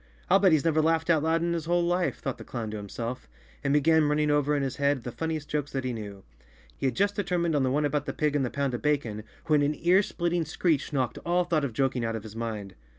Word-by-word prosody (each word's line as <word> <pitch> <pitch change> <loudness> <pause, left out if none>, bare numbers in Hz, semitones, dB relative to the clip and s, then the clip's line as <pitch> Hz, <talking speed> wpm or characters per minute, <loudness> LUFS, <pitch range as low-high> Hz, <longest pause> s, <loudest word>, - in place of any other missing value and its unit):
"I'll 195 - +7
bet 190 -2 +5
he's 155 -1 +3
never 160 -1 +3
laughed 160 +1 +2
out 160 -2 +3
loud 165 +2 +1
in 170 0 0
his 165 -2 -3
whole 175 +1 +2
life," 175 +1 0
thought 135 -3 -4
the - - -7
clown 115 -3 -5
to 110 - -4
himself, 115 - -6 0.3
and 140 - +1
began 155 +2 +4
running 150 0 +2
over 145 0 +2
in 140 - 0
his 130 -1 -3
head 140 -3 +1
the 120 - -5
funniest 160 +1 -3
jokes 150 -1 -2
that 135 -1 -2
he 130 -1 -2
knew. 100 -3 -7 0.5
He 135 - -1
had 125 - -1
just 205 0 +1
de¬ 205 - +1
termined 170 -3 0
on 145 - +2
the 130 - +2
one 145 +3 +1
about 145 0 -1
the - - -2
pig 150 -1 0
and 145 - +2
the 125 - -1
pound 140 -1 -2
of 120 - -3
bacon, 130 -8 -1 0.2
when 155 -3 +3
an 145 +1 +1
ear 180 +3 +4
splitting 175 -3 -1
screech 155 -2 0
knocked 130 -4 -1
all 175 +1 +1
thought 165 -4 0
of 135 -5 -2
joking 130 0 0
out 115 0 -1
of 110 - -5
his 110 -1 -10
mind. 110 -4 -4
145 Hz, 275 wpm, -27 LUFS, 130-165 Hz, 0.5 s, I'll